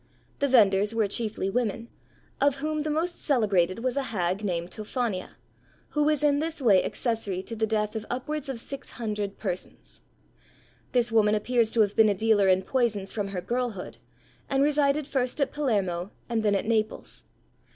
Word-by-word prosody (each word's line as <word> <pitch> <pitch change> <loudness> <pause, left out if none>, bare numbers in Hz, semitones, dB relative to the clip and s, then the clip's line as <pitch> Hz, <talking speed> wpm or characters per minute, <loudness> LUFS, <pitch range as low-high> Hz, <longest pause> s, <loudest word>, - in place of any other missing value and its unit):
The 280 - +2
vendors 210 -4 +4
were 220 -2 +2
chiefly 215 -1 -1
women, 225 +1 -1 0.5
of 280 -1 +4
whom 305 +2 -2
the 305 - -2
most 330 +4 -1
celebrated 205 - +2
was 255 -1 0
a 280 - +1
hag 185 -1 -1
named 175 -3 -2
Tophania, 215 -3 -3 0.5
who 300 - -1
was 300 0 +2
in 285 -1 +3
this 320 +1 -3
way 210 -8 +5
accessory 215 -6 -1
to 230 - -7
the 220 0 0
death 210 0 -1
of 220 0 -4
upwards 280 +3 -3
of 265 - -3
six 275 +4 -7
hundred 210 -4 -3
persons. 185 -4 -6 0.9
This 240 -2 +2
woman 215 -1 +4
appears 230 +1 +1
to 230 - +4
have 205 -1 +1
been 220 -1 +6
a 200 - +1
dealer 210 -1 +3
in 190 0 +4
poisons 215 -4 0
from 205 -2 -2
her 195 -2 -4
girlhood, 240 -4 -3 0.5
and 275 0 +2
resided 290 0 +2
first 260 -1 -1
at 280 -2 +1
Palermo 200 -11 -1 0.2
and 230 -2 0
then 210 -2 +2
at 195 - -1
Naples. 220 -1 -1
225 Hz, 175 wpm, -27 LUFS, 200-265 Hz, 0.9 s, been